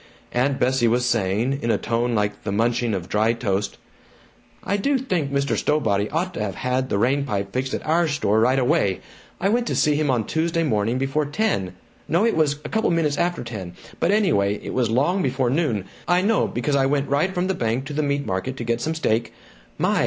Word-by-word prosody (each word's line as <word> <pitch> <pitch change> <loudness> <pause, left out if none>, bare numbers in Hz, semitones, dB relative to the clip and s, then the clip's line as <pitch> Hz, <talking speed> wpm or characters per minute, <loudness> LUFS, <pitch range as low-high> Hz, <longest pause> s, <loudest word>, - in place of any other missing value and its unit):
Aunt 135 +3 +1
Bessie 125 -1 +2
was 120 +2 +2
saying, 115 +4 0
in 115 - -2
a - - +3
tone 120 +1 -1
like 105 -1 -1
the 105 - -3
munching 115 +1 +1
of 90 -2 -5
dry 110 +2 +2
toast: 100 -4 -2 0.9
"I 200 - 0
do 275 +8 +1
think 180 - -1
Mr. 140 0 0
Stowbody 105 -9 +1
ought 180 +4 -1
to - - -4
have 100 -3 -3
had 130 +1 -1
the - - 0
rain 130 +7 +2
pipe 100 -7 -3
fixed 130 +1 -1
at - - -6
our 165 +2 +2
store 125 -8 +1
right 130 +4 +3
away. 125 - +1 0.4
I 195 - +1
went 235 +2 +1
to - - -1
see 150 - +3
him 150 0 0
on 120 -5 +1
Tuesday 165 +1 0
morning 115 -4 0
before 135 +3 0
ten, 145 - -1 0.3
no, 175 +7 +2
it 230 - +2
was 150 -3 +2
couple 220 +9 -1
minutes 160 -4 +1
after 175 -3 0
ten, 100 -7 -7 0.2
but 165 - +1
anyway, 165 - +2
it - - -5
was 125 -3 +1
long 145 - +2
before 130 -3 0
noon 125 - 0 0.2
I 180 +1 +3
know 215 +1 +2
because 140 +4 -1
I 135 -1 +3
went 140 0 0
right 145 +7 +1
from 180 -1 -1
the 190 - 0
bank 120 -2 -1
to 145 - -6
the 150 - 0
meat 140 -1 -1
market 95 +8 -3
to 120 - -4
get 115 0 -1
some 160 +1 -1
steak 115 -7 0 0.5
my! - - +1
135 Hz, 220 wpm, -23 LUFS, 115-160 Hz, 0.9 s, a